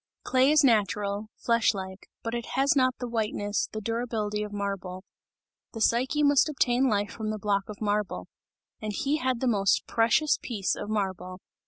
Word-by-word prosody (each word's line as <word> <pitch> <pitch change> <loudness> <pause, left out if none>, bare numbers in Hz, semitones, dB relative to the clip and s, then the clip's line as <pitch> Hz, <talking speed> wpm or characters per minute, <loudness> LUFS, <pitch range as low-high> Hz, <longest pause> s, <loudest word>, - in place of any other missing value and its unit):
Clay 260 +1 +3
is 305 0 +5
natural, 210 -3 +1
flesh 230 -2 +2
like, 190 0 -7 0.2
but 230 - -3
it 235 -1 -3
has 275 +2 +3
not 255 -2 +3
the 245 - -4
whiteness, 210 -3 -1
the 215 - -5
durability 225 -2 -2
of 210 0 -4
marble; 195 -2 -4 0.7
the 225 - -6
Psyche 255 +7 +2
must 285 +1 +4
obtain 260 -2 +2
life 205 -2 0
from 220 -2 -4
the 215 - -2
block 200 0 -1
of 210 - -8
marble 205 - -1 0.6
and 215 -1 -3
he 280 +8 0
had 255 -4 -1
the 260 - +1
most 200 -4 +2
precious 230 +7 +2
piece 210 -6 -2
of 205 - -6
marble. 185 -3 -3
215 Hz, 175 wpm, -27 LUFS, 205-245 Hz, 0.7 s, is